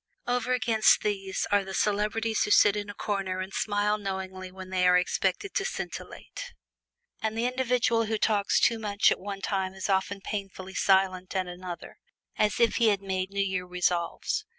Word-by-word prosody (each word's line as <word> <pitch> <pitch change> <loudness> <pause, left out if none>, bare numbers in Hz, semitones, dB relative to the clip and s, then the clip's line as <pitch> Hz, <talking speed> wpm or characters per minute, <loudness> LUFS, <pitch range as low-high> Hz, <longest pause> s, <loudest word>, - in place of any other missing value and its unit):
Over 245 0 0
against 220 -2 +4
these 195 -2 -2
are 205 -1 +4
the 190 0 -6
celebrities 215 +2 0
who - - -2
sit 205 0 +6
in 205 0 -4
a 205 - -7
corner 195 -3 -2
and 190 +2 -5
smile 210 0 0
knowingly 190 -2 -5
when 185 0 -10
they 180 -1 +3
are 180 0 +6
expected 190 - -1
to 395 - 0
scintillate. 485 +4 -6 0.7
And 220 0 -2
the 230 - 0
individual 250 -2 +1
who 220 0 -1
talks 205 -2 +2
too 230 -1 +3
much 210 -1 +3
at - - 0
one 200 0 -6
time 190 -1 -2
is 190 +1 -4
often 195 +1 0
painfully 195 -2 -6
silent 190 -1 +2
at 190 -1 +1
another 180 -1 -8 0.4
as 210 - +1
if 235 -2 +3
he 235 - +4
had 200 -2 +2
made 190 -1 -2
New 200 0 0
Year 185 -2 -2
resolves. 180 - -1
200 Hz, 180 wpm, -28 LUFS, 190-220 Hz, 0.7 s, sit